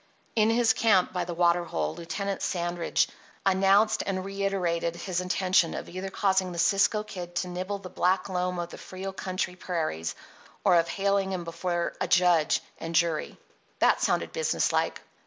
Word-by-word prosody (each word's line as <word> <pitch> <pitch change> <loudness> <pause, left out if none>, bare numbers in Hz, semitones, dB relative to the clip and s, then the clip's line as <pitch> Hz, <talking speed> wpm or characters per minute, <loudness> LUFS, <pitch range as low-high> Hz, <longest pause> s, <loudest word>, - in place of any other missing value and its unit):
In 215 -1 +4
his 230 0 +4
camp 200 -5 +3
by 180 -1 -1
the 175 -1 -5
water 175 0 +3
hole 170 - -2
Lieutenant 195 +4 -4
Sandridge 175 -1 0 0.4
announced 195 +3 +4
and 185 -1 -3
reiterated 190 -4 -1
his 180 0 -2
intention 180 -1 +2
of - - -5
either 185 +2 -5
causing 190 -2 +1
the 175 - -7
Cisco 200 +4 +3
Kid 175 -4 -8
to 180 - -1
nibble 185 +3 -3
the 195 -2 -9
black 185 +1 +1
loam 180 -1 -1
of 175 0 -3
the - - -9
Frio 190 +1 -6
country 185 -1 -3
prairies 155 - -3 0.5
or 185 - +5
of 170 -1 +4
haling 195 +1 0
him 180 -2 -3
before 170 +1 -2
a - - +1
judge 175 -3 +3 0.2
and 165 0 -5
jury. 165 -2 +1 0.4
That - - +3
sounded - - 0
business 480 0 +1
like. - - 0
185 Hz, 170 wpm, -27 LUFS, 175-195 Hz, 0.5 s, or